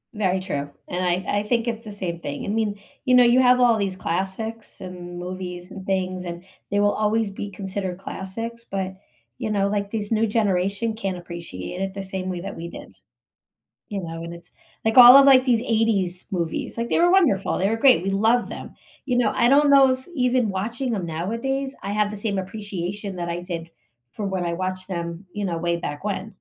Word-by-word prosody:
Very 190 -3 +1
true, 145 -7 -3 0.2
and 180 +1 -2
I 180 +3 0
I - - -2
think 230 +2 0
it's 230 -1 -2
the 215 - -9
same 185 -4 -1
thing. 145 -3 -5
I - - -6
mean, 210 -1 -1 0.2
you 255 -2 +4
know, 250 - +8
you 240 +2 +5
have 250 0 +5
all 240 -2 +5
these 195 -2 -1
classics, 195 +6 -4
and 180 -1 -8
movies, 180 0 -6
and 190 -1 -9
things, 185 -1 -1
and 175 0 -6 0.3
they 205 - +1
will 205 0 +3
always 215 -1 +1
be 205 +1 -6
considered 190 -1 -3
classics, 225 +5 -6
but, 190 -1 -3 0.5
you - - -2
know, 200 -2 +1
like, 200 0 -1
this 210 -1 -3
new 225 0 +2
generation 205 +1 0
can't 195 -4 -3
appreciate 170 - -7
it 195 0 -2
the 195 - -4
same 190 -1 -4
way 180 -2 -4
that 195 +2 -6
we 170 +1 -6
did. - - -11 0.9
You 200 -4 -4
know, 165 -1 -6
and 170 0 -6
it's, 170 - -10 0.3
like 225 +2 +1
all 250 +1 +12
of, 275 0 +8
like, 260 -2 +7
these 240 -4 +3
'80s 220 -7 +1
movies, 170 +1 -2
like, 235 0 -1
they - - +2
were 350 +1 +5
wonderful, 325 - +3
they 195 - +2
were 225 - 0
great, 250 -7 +5
we 195 - 0
love 225 +5 +2
them, - - -8 0.3
you 250 -3 0
know, 245 - +2
I 235 - +4
don't 290 +2 +5
know 270 -1 +7
if 255 0 -5
even 250 -4 +2
watching 230 +6 -2
'em 195 -4 -2
nowadays, 230 +12 -2
I 200 - -4
have 210 0 +2
the 210 - -6
same 205 -1 -1
appreciation 195 0 -4
that 175 -1 -3
I 170 +1 -3
did 170 -2 -6 0.4
from 205 -2 -4
when 185 -2 -1
I 170 - -1
watched 185 +1 -3
them, 170 0 -5
you 205 -1 -3
know, 170 -3 -1
way 170 0 0
back 145 0 -5
when. 205 0 -3
200 Hz, 215 wpm, -23 LUFS, 180-225 Hz, 0.9 s, all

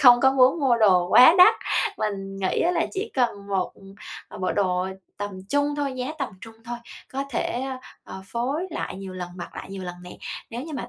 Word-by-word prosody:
không 245 -2 +8
có 265 +1 +5
muốn 270 +4 +4
mua 255 -4 +4
đồ 185 -5 +4
quá 290 - +8
đắt, 360 - +9 0.4
mình 195 -2 -3
nghĩ 190 -1 0
á 345 - +3
là 360 - +1
chỉ 420 +3 -3
cần 230 -6 0
một, 190 -2 -1
ừm, 195 -1 -12
bộ 185 - 0
đồ 185 -2 +1 0.3
tầm 205 0 -3 0.2
trung 285 0 +1
thôi, 285 -2 -1
giá 255 +4 -3
tầm 275 - -1
trung 225 0 -11
thôi, 240 0 -5 0.3
có 275 +1 -2
thể, - - 0 0.2
a, 265 -1 -4 0.3
ờ, 190 - -9
phối 270 - -2
lại 315 - -4
nhiều 190 -1 -7
lần, 180 -1 -6
mặc 175 - -8
lại - - -7
nhiều 195 -1 -6
lần 180 -1 -5
nè. 180 - -10 0.3
Nếu 235 +2 -5
như 315 0 -8
mà 240 -2 -5
235 Hz, 220 wpm, -24 LUFS, 195-270 Hz, 0.4 s, đắt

